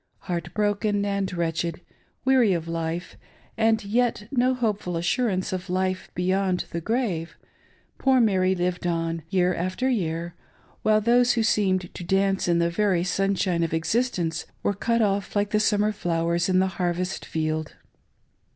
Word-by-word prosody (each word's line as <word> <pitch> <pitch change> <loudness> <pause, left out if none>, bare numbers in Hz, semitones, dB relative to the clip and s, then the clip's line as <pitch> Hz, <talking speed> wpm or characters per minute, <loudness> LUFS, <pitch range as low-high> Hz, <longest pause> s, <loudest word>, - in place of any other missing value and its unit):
Heartbroken 205 +3 -1
and 200 -1 -1
wretched, 170 -1 -2 0.5
weary 255 -6 +4
of 165 -1 -3
life, 165 +1 -4 0.4
and 220 -1 +2
yet 235 +2 +1
with 210 - -16
no 255 +1 +3
hopeful 210 -7 -1
assurance 185 +2 0
of 185 0 -4
life 185 0 -1
beyond 185 0 0
the 170 - -3
grave, 195 -6 -2 0.6
poor 265 -1 +4
Mary 190 -5 +3
lived 180 0 -1
on 165 -1 -1
year 180 -1 +2
after 185 +9 -2
year, 170 -8 -1 0.5
while 215 0 +3
those 240 +2 +4
who 230 - +1
seemed 190 -4 +1
to - - -7
dance 195 +2 +1
in 170 -1 +3
the 170 0 +1
very 185 -2 +1
sunshine 185 -1 0
of 165 -1 0
existence 170 -2 -1 0.2
were 205 - +1
cut 230 +3 +1
off 200 -1 -1
Uke 205 0 +1
the 210 - +3
summer 210 0 +2
flowers 170 -2 0
in 185 - +3
the 190 - +4 0.2
harvest 180 +1 -1
field. 155 -1 -3
185 Hz, 150 wpm, -25 LUFS, 170-210 Hz, 0.6 s, weary